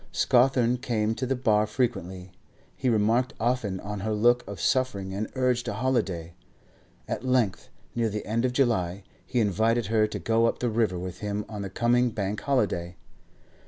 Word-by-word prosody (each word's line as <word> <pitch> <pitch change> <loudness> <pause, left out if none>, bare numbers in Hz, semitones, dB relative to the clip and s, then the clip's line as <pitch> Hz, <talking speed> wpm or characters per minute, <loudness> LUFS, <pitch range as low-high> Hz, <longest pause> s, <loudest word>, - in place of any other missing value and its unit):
Scawthorne 125 -1 +3
came 110 -4 -1
to 130 +3 -3
the 135 - +1
bar 110 -4 +2
frequently. 95 -6 -2 0.4
He 130 - 0
remarked 115 +3 +2
often 115 -5 0
on 105 0 -5
her 110 +3 -2
look 120 +3 +3
of 100 -1 -7
suffering, 100 -8 0
and 105 +2 -3
urged 125 -2 +1
a - - -1
holiday. 100 -10 -1 0.7
At - - -3
length, 125 -7 0 0.2
near 115 -1 0
the 105 0 -4
end 115 +3 0
of 130 - +1
July, 100 -8 0 0.2
he 125 - -1
invited 110 +2 +2
her 110 -1 +4
to - - -5
go 115 +1 +2
up - - -1
the 125 - -1
river 110 -5 +1
with 90 0 -6
him 105 0 -3
on 105 -2 -6
the 100 - -4
coming 120 +2 +2
Bank 105 -2 -3
holiday. 90 -10 0
110 Hz, 175 wpm, -27 LUFS, 100-125 Hz, 0.7 s, her